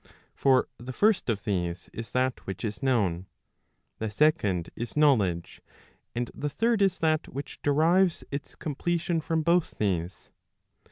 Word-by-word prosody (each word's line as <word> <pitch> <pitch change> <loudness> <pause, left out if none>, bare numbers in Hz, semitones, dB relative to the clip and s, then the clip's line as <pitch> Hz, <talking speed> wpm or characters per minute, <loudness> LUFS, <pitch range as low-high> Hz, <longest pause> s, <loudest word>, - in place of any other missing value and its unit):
For 130 -2 +3
the 125 +2 -7
first 205 - +2
of 105 -3 -1
these 90 -4 -2
is 115 +1 -6
that 130 0 -1
which 95 0 -4
is 105 +3 -4
known, 100 -9 +1 0.7
the 110 - -2
second 105 - +1
is 120 +4 -5
knowledge, 105 - +2 0.5
and 120 0 -2
the 145 - -3
third 225 +6 +1
is 195 -2 +3
that 155 -1 +1
which 140 +2 -7
derives 165 +5 +3
its 140 0 -5
completion 170 +3 -1
from 160 0 0
both 170 +1 +2
these. 90 -4 -2
130 Hz, 145 wpm, -28 LUFS, 105-160 Hz, 0.7 s, For